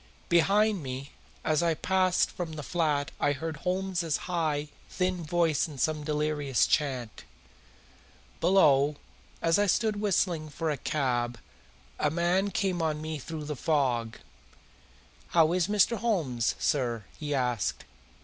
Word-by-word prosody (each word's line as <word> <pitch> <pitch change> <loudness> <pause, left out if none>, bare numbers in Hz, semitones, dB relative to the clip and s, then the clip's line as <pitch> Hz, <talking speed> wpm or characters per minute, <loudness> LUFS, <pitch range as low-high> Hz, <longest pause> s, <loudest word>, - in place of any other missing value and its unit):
Behind 200 +3 +3
me 135 0 -6 0.3
as 155 0 +2
I 170 -1 +2
passed 185 +1 +2
from 170 -3 -5
the 150 -1 -6
flat 150 -3 0
I 145 - +2
heard 160 +2 -5
Holmes's 180 -2 -1
high, 155 -4 -1 0.2
thin 180 -2 -1
voice 165 -2 +1
in 150 -3 -10
some 155 +2 0
delirious 150 -3 +1
chant. 130 -6 -1 1.2
Below, 150 -6 +4 0.5
as 165 +3 +3
I 205 - +3
stood 210 +1 +1
whistling 175 -6 0
for 160 +2 -2
a 145 - -2
cab, 120 -4 -1 0.6
a 150 - +2
man 175 +5 +1
came 185 -2 -1
on 155 -2 0
me 155 0 -4
through 155 +3 -6
the 150 0 -4
fog. 125 -6 0 1.1
"How 165 -1 +4
is 180 -1 +1
Mr. 210 +3 +3
Holmes, 160 - 0
sir?" 120 -6 0 0.2
he 150 -1 -2
asked. 125 -5 -1
155 Hz, 135 wpm, -28 LUFS, 145-180 Hz, 1.2 s, Below